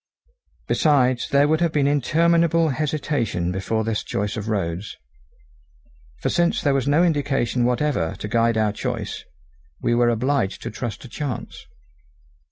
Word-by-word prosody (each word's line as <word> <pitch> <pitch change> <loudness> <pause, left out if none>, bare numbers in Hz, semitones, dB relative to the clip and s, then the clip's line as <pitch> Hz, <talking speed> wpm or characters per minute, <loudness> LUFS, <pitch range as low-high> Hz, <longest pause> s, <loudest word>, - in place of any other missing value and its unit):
Besides 130 -5 +2
there 140 +1 +4
would 160 +2 +1
have 170 -2 +2
been 145 -2 +1
interminable 165 +3 +3
hesitation 140 - -1
before 105 +4 -1
this 110 -1 -2
choice 105 +1 -3
of 110 0 -4
roads; 95 -2 -3 1.2
for - - -2
since 175 0 +1
there 145 - +1
was 135 -1 0
no 150 +4 +4
indication 140 -7 +1
whatever 125 - 0
to - - -6
guide 115 +1 +2
our 110 -1 +2
choice, 105 - -4 0.6
we 120 - 0
were 120 0 +3
obliged 120 -2 0
to - - -4
trust 110 -1 -5
to - - -9
chance. 135 -1 -6
125 Hz, 145 wpm, -22 LUFS, 110-150 Hz, 1.2 s, there